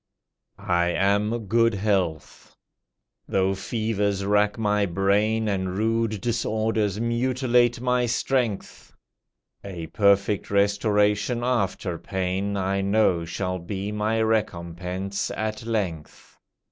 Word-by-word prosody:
I 85 0 +1
am 105 +5 +1
good 115 +2 +2
health. 95 -6 -2 0.7
Though 95 0 +1
fevers 100 -1 -1
rack 105 +1 +2
my 105 -2 +1
brain 100 +5 +1
And 95 -2 -2
rude 115 -1 0
disorders 110 -3 -1
mutilate 120 0 +1
my 125 0 +1
strength, 120 -3 -2 0.7
A 90 -4 -6
perfect 100 +1 +2
restoration 105 +3 +1
after 100 -8 -1
pain, 95 +2 -2
I 95 +1 0
know 100 -4 +2
shall 90 +2 -3
be 100 +3 -4
my 105 +1 0
recompense 95 -2 -2
at 110 +1 -3
length. 95 -9 -4
105 Hz, 100 wpm, -24 LUFS, 95-110 Hz, 0.7 s, good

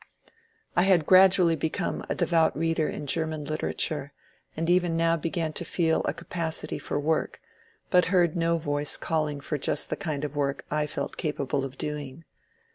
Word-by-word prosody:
I - - +4
had 180 -4 +4
gradually 185 -2 +6
become 160 +3 -2
a - - 0
devout 165 -4 +2
reader 165 -1 0
in 150 - -5
Grerman 155 0 -2
litera 155 0 -2
ture, 145 -2 -1 0.4
and 165 +1 -1
even 175 -2 +2
now 165 0 +3
began 165 0 -2
to - - -2
feel 165 -1 +1
a - - 0
capacity 160 -3 -3
for - - -3
work, 155 +2 -1 0.5
but 180 -2 +5
heard 175 -2 +2
no 170 0 +1
voice 145 -2 +1
calling 155 -3 -1
for 150 +1 -3
just 145 - 0
the - - +1
kind 155 -7 -4
of 150 -1 -4
work 140 -1 -1
I 150 0 0
felt 150 - -5
capable 140 -4 -2
of 135 0 -6
doing. 150 +1 -5
160 Hz, 175 wpm, -27 LUFS, 150-170 Hz, 0.5 s, gradually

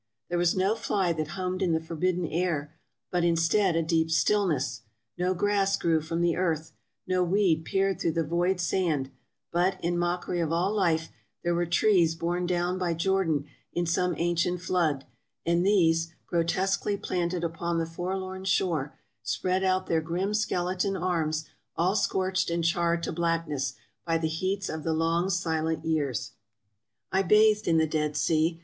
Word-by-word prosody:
There 175 - 0
was 175 -1 +2
no 190 +3 +2
fly 200 -5 0
that 155 -2 -3
hummed 185 0 -2
in 180 -3 +2
the 160 - +2
forbidden 170 +2 -1
air, 155 -3 -1 0.4
but, 180 -1 +1
instead, 170 +2 +2
a 165 - +2
deep 160 0 +1
stillness 160 - +1 0.2
— 110 -2 -55
no 180 +1 +1
grass 200 +1 +2
grew 165 -2 +1
from 165 +2 -3
the 175 -1 +2
earth 165 -3 -1 0.2
— - - -54
no 185 0 +2
weed 175 -3 +2
peered 195 -1 0
through 165 - +1
the 165 - +1
void 175 +4 0
sand; 165 -7 0 0.4
but, 185 +2 +1
in 175 +1 0
mockery 175 0 -1
of 165 -2 0
all 180 +5 +1
life, 165 -6 +1 0.3
there 175 - +1
were 175 0 0
trees 170 -2 +3
borne 175 +2 -1
down 180 +1 0
by 175 -2 0
Jordan 165 -4 +1 0.3
in 175 - 0
some 175 +1 +1
ancient 175 +1 0
flood, 170 -7 0 0.4
and 170 +1 +2
these, 165 -4 +3
grotesquely 190 +4 0
planted 175 -2 -2
upon 170 +1 -2
the 165 - 0
forlorn 185 +3 -4
shore, 170 -6 0 0.2
spread 185 +1 -1
out 185 0 +1
their 165 -1 +1
grim 180 +6 -2
skeleton 190 -2 0
arms 160 -3 -1 0.3
all 180 +4 +1
scorched 190 -3 0
and 170 0 -1
charred 170 0 +1
to - - -2
blackness, 160 -6 -1 0.3
by 165 -1 +1
the 160 -1 -1
heats 185 +5 -2
of 160 - -4
the 165 - 0
long, 165 +3 +1
silent 160 -3 -1
years. 145 -7 -1 0.8
I 190 - +3
bathed 210 +3 +4
in 165 -1 +4
the 160 - +4
Dead 150 -1 -1
Sea. 165 +1 +1
170 Hz, 170 wpm, -27 LUFS, 165-185 Hz, 0.8 s, bathed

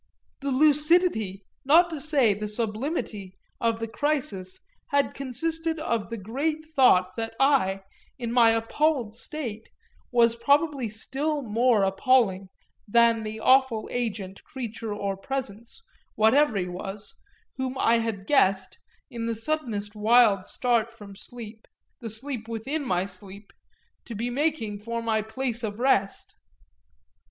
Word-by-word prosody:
The 280 - -3
lucidity, 295 - +3 0.2
not 335 +5 +5
to 310 -3 -5
say 275 -8 +3
the 210 +1 -4
sublimity, 210 - -3 0.2
of 230 -1 0
the 225 - -3
crisis 225 -9 -2 0.3
had 285 0 +1
consisted 320 +5 -3
of 230 -9 -2
the 230 - -4
great 285 +10 -3
thought 250 -12 +3
that 225 0 -4
I, 260 -9 +3 0.4
in 235 -3 -4
my 235 -1 +6
appalled 225 +1 +1
state, 230 -3 -6 0.4
was 235 -1 +4
probably 280 +1 +1
still 280 +7 -2
more 230 -1 +2
appalling 195 -1 +2 0.4
than 230 +1 +4
the 220 0 -6
awful 260 -4 +3
agent, 205 -6 -4
creature 230 -3 -6
or 200 -1 -2
presence, 235 - -5 0.3
whatever 225 +2 +4
he 180 -2 -1
was, 195 +3 -5 0.4
whom 260 0 -3
I 230 -2 +3
had 220 -4 -3
guessed, 195 -9 +2 0.3
in 230 -1 -4
the 230 - -1
suddenest 225 -6 -2
wild 215 -3 +4
start 235 -2 0
from 205 -3 -12
sleep, 225 0 -9 0.3
the 230 - -6
sleep 225 +1 -5
within 260 +7 -3
my 180 -7 0
sleep, 200 +1 -10 0.5
to 235 - -7
be 235 +4 -3
making 260 -7 -1
for 230 +2 -4
my 220 -1 +1
place 235 +2 -3
of 210 -3 -4
rest. 230 -6 0
230 Hz, 135 wpm, -26 LUFS, 210-270 Hz, 0.5 s, my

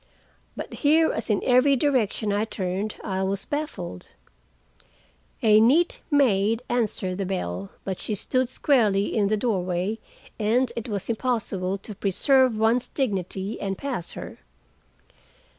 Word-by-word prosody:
But - - -6
here, 320 +2 +4
as - - -4
in 210 - +1
every 255 +2 +4
direction 235 -6 +1
I 205 +2 +1
turned, 195 0 -3
I 190 -2 -2
was 195 +1 -2
baffled. 205 - -5 1.4
A 215 -1 +6
neat 290 +11 +3
maid 230 -5 +2
answered 210 -6 -1
the 195 - -1
bell, 95 - -3
but 190 -2 -4
she 215 - -3
stood 255 +5 0
squarely 215 -8 +2
in 205 -3 +2
the 215 +1 +1
doorway, 190 -1 -1 0.4
and 235 +4 +2
it 235 0 -5
was 200 -3 -3
impossible 220 -6 -1
to 210 +2 -9
preserve 245 +5 +3
one's 230 +3 +2
dignity 195 - -3
and 195 -1 -2
pass 255 -11 -4
her. - - -8
215 Hz, 135 wpm, -25 LUFS, 195-250 Hz, 1.4 s, A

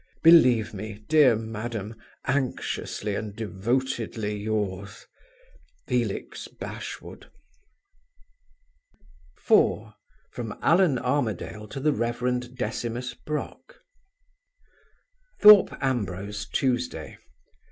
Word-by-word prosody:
"Believe 125 -11 +6
me, 105 +1 -8
dear 150 -6 +6
madam, 110 -1 -5 0.3
anxiously 130 -5 -2
and 105 0 -4
devotedly 110 0 -2
yours, 105 -1 -3 0.8
FELIX - - -2
BASHWOOD." - - -8 2.1
4. 110 0 +2 0.4
From 115 -3 -6
Allan 165 -5 +4
Armadale 110 -5 -2
to 135 - -7
the 150 +2 +2
Reverend 125 +1 -2
Decimus 120 +1 -3
Brock. 150 - -6 1.6
Thorpe 210 -2 +8
Ambrose, 105 -5 -2
Tuesday. 125 -9 -2
115 Hz, 75 wpm, -26 LUFS, 105-130 Hz, 2.1 s, Thorpe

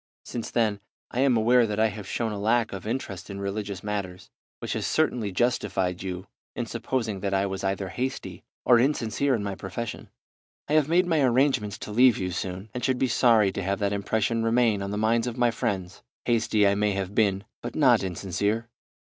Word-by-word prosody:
Since 120 -2 -5
then 110 -4 +1 0.3
I 125 - -3
am 130 -3 +4
aware 120 +2 +4
that 105 0 -3
I 110 0 +4
have 105 -1 -8
shown 115 -2 -2
a 105 - -4
lack 115 +2 +1
of 95 +1 -6
interest 110 -6 -4
in 100 0 -6
religious 100 -1 -4
matters, 100 -2 -5 0.3
which - - -4
has - - -2
certainly 125 -10 +1
justified 95 -5 0
you 90 -1 -5 0.3
in - - -2
supposing 115 -6 -2
that 100 0 -1
I 95 +1 +2
was 95 0 -4
either 95 0 -1
hasty 130 +8 -4 0.2
or 120 -1 +6
insincere 130 0 +1
in 105 - -3
my 100 -1 -3
profession. 100 +4 -6 0.6
I 150 - -1
have 155 -1 +3
made 180 +2 +4
my 165 -4 +2
arrangements 125 -5 +2
to - - -7
leave 125 +2 +5
you 90 -1 -2
soon, 95 +3 -5
and 125 - -5
should 130 -2 +1
be 130 - +1
sorry 115 -4 +4
to - - -4
have 100 +1 -1
that 100 -1 0
impression 110 +3 0
remain 115 -3 +2
on 100 - -3
the 105 - -3
minds 115 +2 +2
of 120 0 -4
my 120 -1 +3
friends. 95 -4 -3 0.2
Hasty 110 -3 +2
I 100 - +4
may 105 0 +1
have 95 0 -3
been, 100 -3 +2 0.2
but 120 - -6
not 125 -7 +5
insincere. 100 +5 -2
110 Hz, 205 wpm, -26 LUFS, 100-120 Hz, 0.6 s, or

